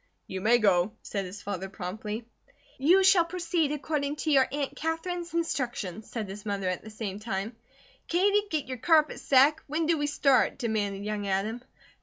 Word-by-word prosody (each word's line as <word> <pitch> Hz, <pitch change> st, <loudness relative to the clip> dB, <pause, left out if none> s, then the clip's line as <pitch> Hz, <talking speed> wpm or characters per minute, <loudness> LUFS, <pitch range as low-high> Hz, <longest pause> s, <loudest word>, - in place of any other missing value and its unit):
"You 190 Hz, 0 st, -5 dB
may 230 Hz, +4 st, +5 dB
go," 195 Hz, -2 st, +3 dB
said 200 Hz, -2 st, -3 dB
his 190 Hz, +3 st, -9 dB
father, 195 Hz, -1 st, -4 dB
promptly. 210 Hz, +4 st, -5 dB, 0.5 s
"You 355 Hz, +8 st, +5 dB
shall 380 Hz, -2 st, +6 dB
proceed 335 Hz, -3 st, -1 dB
according 295 Hz, -1 st, -2 dB
to 310 Hz, +1 st, -2 dB
your 270 Hz, -2 st, +5 dB
Aunt 280 Hz, -1 st, -3 dB
Katherine's 335 Hz, +2 st, -3 dB
instructions," 240 Hz, -, -2 dB
said 220 Hz, -4 st, -4 dB
his 195 Hz, +2 st, -8 dB
mother, 200 Hz, -2 st, -2 dB
at 185 Hz, -1 st, -2 dB
the 220 Hz, -, -9 dB
same 210 Hz, -2 st, -5 dB
time. 215 Hz, +1 st, -4 dB, 0.5 s
"Katie, 405 Hz, +4 st, +2 dB
get 310 Hz, -5 st, -1 dB
your 255 Hz, -1 st, -5 dB
carpet 310 Hz, +2 st, +3 dB
sack! 280 Hz, +4 st, +4 dB
When 310 Hz, +3 st, -1 dB
do 325 Hz, -1 st, +2 dB
we 290 Hz, -, 0 dB
start?" 275 Hz, -3 st, +3 dB
demanded 205 Hz, -5 st, -2 dB
young 210 Hz, -1 st, -3 dB
Adam. 205 Hz, +5 st, -1 dB
245 Hz, 175 wpm, -28 LUFS, 205-315 Hz, 0.5 s, shall